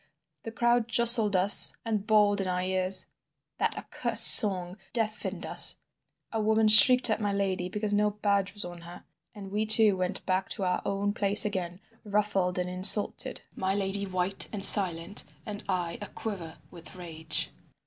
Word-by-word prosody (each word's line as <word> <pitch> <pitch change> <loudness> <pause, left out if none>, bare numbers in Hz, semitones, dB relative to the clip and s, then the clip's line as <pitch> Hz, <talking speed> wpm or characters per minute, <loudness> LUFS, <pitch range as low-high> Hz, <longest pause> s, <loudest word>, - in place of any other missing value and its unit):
The 225 - -11
crowd 235 0 -3
jostled 230 -3 +3
us 190 +2 +6
and 215 -2 -6
bawled 205 -2 -1
in 190 - -7
our 180 0 -5
ears; 185 0 -1 0.5
that - - -4
accursed 230 -2 +2
song 185 -3 +2 0.2
deafened 215 -3 -7
us; - - +2 0.5
a 225 - -5
woman 220 +1 -1
shrieked 245 +3 +5
at 220 - -4
my 205 -1 -4
lady 190 -2 -6
because 210 +1 -6
no 210 0 -2
badge 200 -2 -5
was 205 - -5
on 175 -1 -13
her, 170 +1 -15 0.3
and 195 -2 -13
we 215 +2 -5
two 215 -2 +5
went 185 -1 -6
back 185 0 -5
to 195 - -9
our 180 -1 -4
own 200 +1 -5
place 205 0 +5
again, 185 -3 -8 0.2
ruffled 200 -3 -4
and 180 0 -5
insulted—my 190 0 +2
lady 200 0 -5
white 185 +1 -5
and 200 -3 +3
silent, 185 -1 +4 0.2
and 210 -1 -10
I 175 -3 -6
aquiver 200 -5 -11
with 170 +2 -15
rage. 160 -3 -5
200 Hz, 160 wpm, -24 LUFS, 185-210 Hz, 0.5 s, us